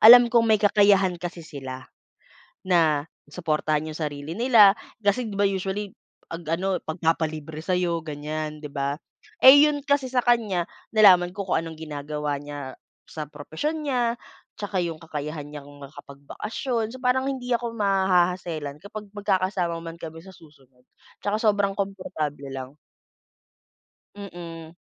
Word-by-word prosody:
alam 240 +1 +9
kong 230 -1 +5
may 215 - +6
kakayahan 200 -3 +4
kasi 175 -2 -6
sila. 130 -4 -8 0.8
Na 160 -5 +3 0.2
suportahan 155 -2 -1
yung - - -11
sarili 150 0 -4
nila. 225 -4 +7 0.3
Kasi 215 +3 +1
'di 200 - -6
ba 200 - +3
usually, 195 +1 -2 0.3
'pag 165 +1 -7 0.2
ano, 190 -1 -1
magpapalibre 160 -1 -2
sa'yo 175 -1 0
ganyan, 155 0 -4
di 150 - -6
ba. 140 +1 -2 0.5
Eh, 285 +3 +10
yun 290 -1 -1
kasi 285 -2 +2
sa 250 -1 +2
kanya, 210 -8 +2 0.3
nalaman 185 -5 +6
ko 200 - -3
kung - - +2
anong 165 -1 -7
ginagawa 150 -1 -3
niya 145 -2 -7 0.4
sa 155 -1 -5
propesyon 160 - -4
niya, 245 -5 +1 0.5
tsaka 205 -2 -3
yung 165 -2 -4
kakayahan 150 -1 -5
niyang 145 -1 -9
makapagbakasyon. 210 - -5
So, 260 - -9
parang 260 +1 +2
hindi 250 -2 -6
ako 235 -1 -3
maha-hassle-an 180 -7 +1
kapag 210 +1 -8
magkakasama 185 -4 0
man 165 0 -8
kami 160 -1 -8
sa 190 - -14
susunod. 135 -6 -21 0.4
Tsaka 205 +1 0
sobrang 205 -2 +2
komportable 185 -8 -4
lang. 130 +1 -7 1.4
Mm, 170 -4 -9
175 Hz, 140 wpm, -25 LUFS, 150-205 Hz, 1.4 s, Eh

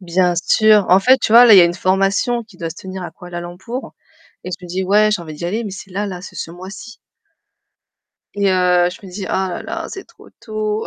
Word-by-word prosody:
Bien 180 0 +1
sûr. 210 +3 +3
En 185 - +6
fait, 260 +5 +5
tu 220 - -1
vois, 240 +1 +9
là, 230 - +7
il - - +9
y - - +10
a 175 - +7
une 170 0 0
formation 195 +6 0
qui 215 -5 -19
doit 165 -2 -5
se 160 - -10
tenir 190 0 -8
à 175 - -6
Kuala 175 -1 -9
Lumpur 190 +9 -7 0.5
et 185 - -6
je 180 0 -7
me - - -10
dis: 185 +2 -2
«Ouais, 210 +3 +3
j'ai 205 - -1
envie 155 -2 -9
d'y 160 - -8
aller», 210 +7 -2
mais 205 - -5
c'est 195 0 -10
là, 200 +3 -3
là, 180 -3 -6
c'est - - -11
ce - - -5
mois-ci. 190 +6 -10 1.4
Et 200 -1 +1
heu, 180 -1 +3
je 185 - -13
me - - -11
dis: 195 +1 -6
«Oh - - -7
là 190 -1 -2
là 330 0 -5
c'est 390 - -8
trop - - -19
tôt». 215 -1 -3
190 Hz, 255 wpm, -18 LUFS, 180-215 Hz, 1.4 s, y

